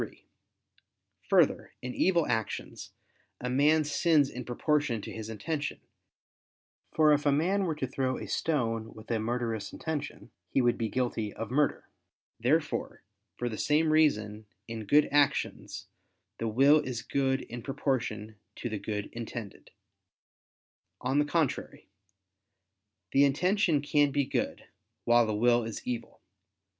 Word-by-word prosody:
3: - - -8 1.0
Further, - - +3
in 125 0 -4
evil 170 -4 +2
actions, 110 -2 -3 0.5
a 125 0 -3
man 150 +4 +4
sins 150 -1 +2
in 125 - -6
proportion 135 0 0
to - - -7
his 110 0 -6
intention: 145 +8 -3 1.2
for 155 -1 +6
if 145 0 +1
a - - +5
man 185 +7 +2
were 160 -3 -1
to 150 - -2
throw 130 0 -1
a - - -6
stone 115 -8 -1
with 110 +2 -9
a 115 - +1
murderous 115 -2 -2
intention, 160 -3 -5 0.2
he - - +1
would 120 -2 +3
be 115 -1 -2
guilty 120 -4 -1
of 115 +2 -6
murder. 145 +2 +1 0.5
Therefore, 145 +6 0 0.3
for 120 - -2
the 110 -3 -4
same 155 +1 +2
reason, 110 -9 +2 0.2
in 115 -2 -6
good 150 +7 +5
actions, 145 -1 0 0.5
the 115 - -1
will 135 +7 +5
is 125 -5 -4
good 135 -1 0
in 120 +1 -8
proportion 115 -5 -2 0.2
to 120 - -4
the 110 -2 -3
good 105 -1 -3
intended. 115 -3 -7 1.3
On 130 +3 +1
the 150 - +3
contrary, 145 - -2 1.2
The 140 - +5
intention 165 +2 +2
can 145 0 +3
be 140 0 0
good, - - -2 0.4
while 120 -1 +5
the 110 - -1
will 120 +2 +3
is 110 -1 -6
evil. 120 -2 -5
130 Hz, 140 wpm, -29 LUFS, 115-150 Hz, 1.3 s, for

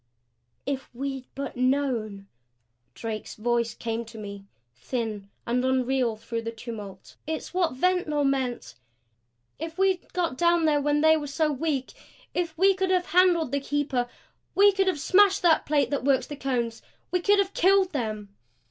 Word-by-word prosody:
"If 270 -1 -3
we'd 270 0 -4
but 275 -1 -5
known!" 250 -6 0 0.7
Drake's 220 -2 -5
voice 235 +1 0
came 230 0 -3
to 225 0 -12
me, 200 -2 -8 0.3
thin 205 - -4 0.2
and 245 +2 0
unreal 260 -2 +1
through 230 +1 -5
the 230 - -4
tumult. 215 -5 -9
"It's 315 +2 -4
what 355 -6 +1
Ventnor 315 -2 +1
meant! 260 - -1 0.9
If 325 +2 -6
we 385 -1 +3
had - - -30
got 340 -8 -2
down 340 -1 +3
there 295 -2 +3
when 295 +1 +1
they 315 0 +6
were 295 -1 -4
so 300 +2 0
weak 280 -2 -2 0.4
if 335 -3 -2
we 390 +3 +5
could 380 0 -1
have 365 -1 +2
handled 345 -4 +3
the 280 - +1
Keeper 275 -3 -1 0.5
we 405 +1 +7
could 385 0 +1
have 365 -5 +1
smashed 390 +6 +4
that 330 -2 +4
plate 295 -1 +2
that 285 - -1
works 270 -1 +2
the 295 - -7
Cones! 240 -4 -2 0.3
We 360 - +2
could 405 +3 +4
have 400 0 +1
killed 380 +1 +4
them!" 215 -7 -3
275 Hz, 165 wpm, -26 LUFS, 235-340 Hz, 0.9 s, we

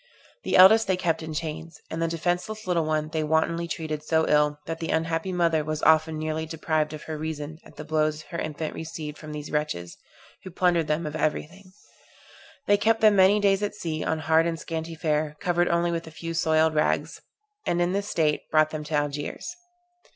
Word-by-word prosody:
The - - 0
eldest 215 +4 +8
they 190 -1 +1
kept 165 -3 0
in 160 0 -6
chains; 160 +1 -5
and 160 - -3
the 165 - +2
defenceless 175 +6 -2
little 175 -3 +1
one 155 0 -1
they 160 -1 -1
wantonly 160 +2 +1
treated 155 -2 -4
so 160 +1 +1
ill, 150 0 +3
that 165 0 -4
the 165 - -4
unhappy 165 +3 -1
mother 170 -3 +2
was 155 0 -4
often 160 0 +4
nearly 155 +1 -3
deprived 155 -1 -1
of 155 - -8
her 155 -1 -6
reason 155 0 -5
at - - -17
the - - -7
blows 155 0 0
her 170 - -2
infant 155 0 -4
received 155 -2 -7
from 155 - -9
these 150 0 -6
wretches, 150 - -3 0.5
who 185 - -7
plundered 175 -2 +1
them 155 +2 0
of 150 0 -5
every 155 -1 0
thing. 185 +4 -17 0.9
They 205 - +4
kept 225 +2 +2
them 215 -2 +6
many 195 +2 +5
days 200 -1 +3
at 205 0 -2
sea 160 -6 -3
on 160 - 0
hard 160 +2 +3
and 165 -1 -3
scanty 165 0 -5
fare, 150 -1 -1
covered 175 0 +1
only 170 0 +1
with 165 -1 -3
a - - -7
few 165 +1 -6
soiled 160 -1 +2
rags; 150 - 0 0.5
and 175 - +1
in 175 +1 +2
this 200 +2 -2
state 155 -3 0
brought 155 0 +3
them 155 -1 -4
to 155 - -3
Algiers. 145 - -3
160 Hz, 205 wpm, -26 LUFS, 155-170 Hz, 0.9 s, eldest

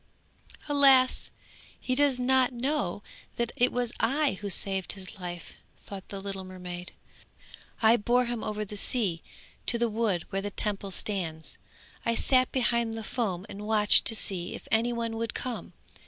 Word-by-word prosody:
'Alas! 275 -3 +5 0.5
he 255 - -1
does 275 -1 +3
not 260 0 +3
know 245 -6 -1 0.3
that 235 -1 -1
it 245 +1 +3
was 245 -1 -1
I 280 +5 +2
who 205 - -3
saved 190 0 +1
his 190 0 -8
life,' 175 -2 -6 0.3
thought 195 -2 -8
the 200 - -5
little 195 -1 -5
mermaid. 180 -1 -7 0.9
'I 225 +2 +7
bore 245 +3 +2
him 240 -2 -3
over 210 0 -2
the 210 - -8
sea 200 -6 0 0.5
to 235 - +3
the 235 0 +1
wood 210 -6 0
where 195 0 -1
the 205 - -3
Temple 200 -1 -2
stands. 175 -5 -2 0.4
I 230 - +1
sat 255 +2 +3
behind 235 -3 +1
the 225 - -5
foam 200 -7 -2
and 210 0 -7
watched 210 -2 +5
to 225 - +1
see 185 -4 -3
if - - -11
any 230 +2 +3
one 230 -1 -2
would 230 -1 -3
come. 250 -2 -5
220 Hz, 165 wpm, -29 LUFS, 195-245 Hz, 0.9 s, I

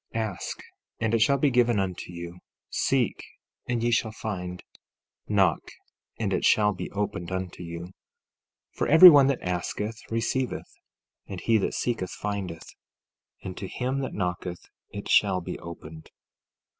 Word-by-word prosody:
14:7 - - +1
Ask, 95 -4 -6 0.4
and 110 0 0
it 115 - +3
shall 140 +5 +4
be 140 +1 +2
given 120 -3 +3
unto 90 -2 -3
you; 85 0 -8 0.3
seek, - - 0 0.5
and 120 -2 0
ye 120 - +2
shall 115 -1 +1
find; 90 -5 -5 0.6
knock, 95 -6 +2 0.5
and 100 -4 0
it 95 - 0
shall 105 -1 +4
be 95 - -6
opened 100 -3 -3
unto 95 -1 -4
you. 85 -1 -6
14:8 90 +2 -9 0.8
For - - -1
every 160 +4 +11
one 140 -3 +6
that 140 -2 0
asketh, 105 +5 -3
receiveth; 120 +3 -2 0.5
and 95 - -6
he 115 +2 +2
that - - -1
seeketh, 115 -7 -1
findeth; 100 -5 -5 0.7
and 95 - -6
to 95 - -5
him 130 +6 -2
that 135 - -4
knocketh, 90 -2 -3 0.2
it 100 0 -7
shall 95 -3 +4
be 90 - -6
opened. 80 -1 -10
100 Hz, 155 wpm, -27 LUFS, 90-115 Hz, 0.8 s, every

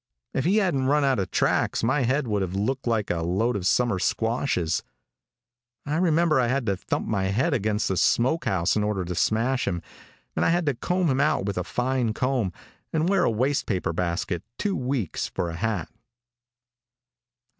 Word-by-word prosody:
If 135 - -1
he 195 +5 +3
hadn't 165 -11 +1
run 145 +1 +3
out 135 -5 +2
of 95 - -2
tracks - - +1
my 135 +5 +2
head 130 +2 +1
would 105 -2 0
have 95 0 -3
looked 125 +7 -1
like 110 -3 0
a 85 -1 -1
load 95 +8 0
of 95 -2 -1
summer 120 -5 +2
squashes. 110 -5 0 1.0
I 150 +2 -1
remember 165 -3 +3
I 125 - +2
had 130 +1 0
to 100 -3 +1
thump 90 - -3
my 100 -3 0
head 120 - +1
against 110 -3 0
the 95 - 0
smoke 130 - +2
house 90 -2 +1
in 105 - +1
order 105 -3 -1
to 90 - -3
smash 115 +8 +1
him, 85 -3 -2 0.5
and - - +1
I - - +3
had 175 0 +2
to 145 - +2
comb 180 +9 -1
him 135 -3 +2
out 150 -9 +2
with 100 -2 -2
a - - -2
fine 125 +1 -1
comb, 125 -7 0 0.4
and 160 +2 +1
wear 195 -2 +3
a - - +3
waste 130 +6 0
paper 90 -5 -1
basket 85 0 -2 0.2
two 200 -2 -1
weeks 125 - -2
for 85 -1 -3
a - - -6
hat. 105 -2 -2
115 Hz, 195 wpm, -25 LUFS, 95-140 Hz, 1.0 s, he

